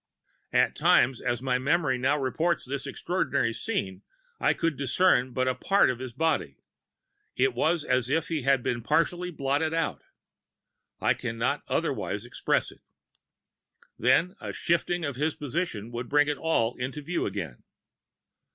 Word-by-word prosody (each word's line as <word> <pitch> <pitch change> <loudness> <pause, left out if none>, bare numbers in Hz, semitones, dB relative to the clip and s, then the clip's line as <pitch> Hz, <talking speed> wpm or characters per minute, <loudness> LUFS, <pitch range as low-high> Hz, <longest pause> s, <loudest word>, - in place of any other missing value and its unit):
At - - +3
times, 130 -1 +3
as 120 0 -2
my 125 -1 +1
memory 140 -1 +1
now 140 +4 +2
reports 160 +5 0
this 135 +1 -4
extraordinary 140 -10 -1
scene, 100 - -3 0.4
I - - +2
could 165 -2 0
discern 140 -1 +2
but 130 +1 0
a 130 - +2
part 195 0 +3
of 125 - -6
his 130 -1 -6
body; 145 - -1 0.8
it 130 0 +2
was 160 +6 +1
as 125 -3 +1
if 160 +3 +1
he 160 -3 -2
had 135 -1 +2
been 120 -1 -1
partly 175 +7 +1
blotted 150 +1 -1
out 110 - -1 1.0
I - - +3
can 115 -2 -5
not 115 - 0
otherwise - - -2
express - - 0
it - - -19 1.2
then 135 - +3
a - - -5
shifting 170 0 0
of 140 -4 -4
his 150 +2 0
position 130 - -3
would 120 0 -5
bring 145 0 +4
it 150 -1 -1
all 125 -8 +1
into 135 +4 -4
view 170 +4 -1
again. 95 -11 -5
135 Hz, 155 wpm, -27 LUFS, 125-160 Hz, 1.2 s, bring